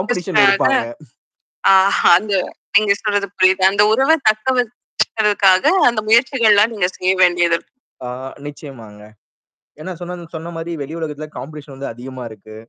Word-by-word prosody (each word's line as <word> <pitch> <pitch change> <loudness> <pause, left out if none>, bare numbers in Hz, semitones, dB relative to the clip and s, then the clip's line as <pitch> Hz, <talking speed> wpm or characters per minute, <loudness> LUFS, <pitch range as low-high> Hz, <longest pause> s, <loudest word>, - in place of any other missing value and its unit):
Competition 190 -1 -2
இருப்பாங்க. 195 -11 +3 0.9
ஆஹா! 190 +1 +3
அந்த 210 +1 -7 0.4
நீங்க 205 -1 +4
சொல்றது 205 -2 -1
புரியுது. 185 0 +3
அந்த 200 +1 +2
உறவ 270 +7 +3 0.2
தக்கவச்சிக்கிறதுக்காக, 215 -4 0 0.2
அந்த 235 -3 -1
முயற்சிகள்லாம் 230 -3 +3
நீங்க 200 -4 0
செய்ய 185 +1 +1
வேண்டியது 175 -1 +3
இருக்கு. - - -26 0.3
ஆ - - -5 0.4
நிச்சயமாங்க. 120 -8 -11 0.8
ஏன்னா 185 +4 -7
சொன்ன, 175 0 -7 0.2
சொன்ன 160 +2 -7
மாரி 165 +1 -6
வெளி 145 +3 -8
உலகத்தில 155 -1 -6
காம்படிஷன் 150 -1 -10
வந்து 135 -2 -7
அதிகமா 130 +2 -10
இருக்கு. 110 0 -14
185 Hz, 130 wpm, -17 LUFS, 155-210 Hz, 0.9 s, நீங்க